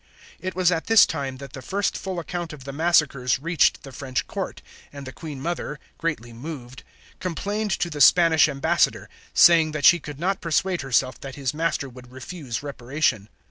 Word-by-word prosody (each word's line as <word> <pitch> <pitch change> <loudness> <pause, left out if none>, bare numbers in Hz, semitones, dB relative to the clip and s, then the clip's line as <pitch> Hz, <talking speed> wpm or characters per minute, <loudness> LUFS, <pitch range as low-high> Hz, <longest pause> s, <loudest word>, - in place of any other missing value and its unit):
It 185 0 -5
was 180 -1 +3
at 165 -2 -2
this 225 -1 +7
time 135 -4 -4
that 140 0 -10
the 135 - -8
first 200 +10 -1
full 190 -2 -5
account 170 -1 -4
of 140 -4 -11
the 140 +1 -7
massacres 145 -5 +2
reached 170 +5 +2
the 135 - -10
French 130 0 -3
court, - - -5 0.3
and 140 -1 -9
the 130 - -7
Queen 150 -1 -8
Mother, 155 -1 -4 0.2
greatly 145 -8 -3
moved, 125 -1 -8 0.4
complained 205 +5 -3
to - - -1
the 150 -3 -5
Spanish 160 -1 +6
ambassador, 140 -1 +1 0.3
saying 160 -2 +6
that 150 -3 -1
she 175 - +7
could 145 -1 -9
not 190 +3 -1
persuade 175 +2 0
herself 130 -1 0
that 135 -1 -8
his 135 -3 -2
master 160 -2 -1
would 125 -1 -13
refuse 130 -1 -6
reparation. 130 -5 -1
150 Hz, 180 wpm, -24 LUFS, 130-170 Hz, 0.4 s, this